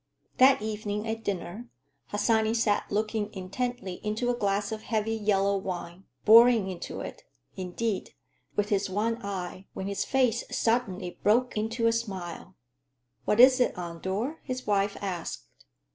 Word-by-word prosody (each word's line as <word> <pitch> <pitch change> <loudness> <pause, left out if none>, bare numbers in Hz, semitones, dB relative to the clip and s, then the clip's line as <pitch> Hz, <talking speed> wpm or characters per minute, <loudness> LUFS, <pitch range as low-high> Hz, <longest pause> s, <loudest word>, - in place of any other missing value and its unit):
That 260 -3 +6
evening 210 0 -3
at 225 0 -3
dinner 200 +4 -4 0.4
Harsanyi 220 +1 +2
sat 220 -3 +1
looking 215 0 -1
intently 195 0 -4
into 220 +4 0
a - - -1
glass 200 -2 0
of 220 -1 -4
heavy 220 0 -1
yellow 200 -2 +2
wine; 185 -1 -5 0.2
boring 230 -2 +7
into 175 - -6
it, - - -7 0.3
indeed, 190 +3 -3 0.4
with 205 0 0
his 200 -2 +1
one 225 +5 -1
eye, 190 -1 -5
when 190 - -4
his 200 0 -1
face 250 -4 +2
suddenly 195 -6 -1
broke 240 +5 +3
into 225 +2 -1
a 230 - +5
smile. 190 -5 -5 0.7
"What 210 - +1
is 255 +1 +8
it, 245 - +2
Andor?" 190 - -3
his 255 -1 -5
wife 200 -1 +1
asked. 180 -4 -4
210 Hz, 145 wpm, -28 LUFS, 195-230 Hz, 0.7 s, is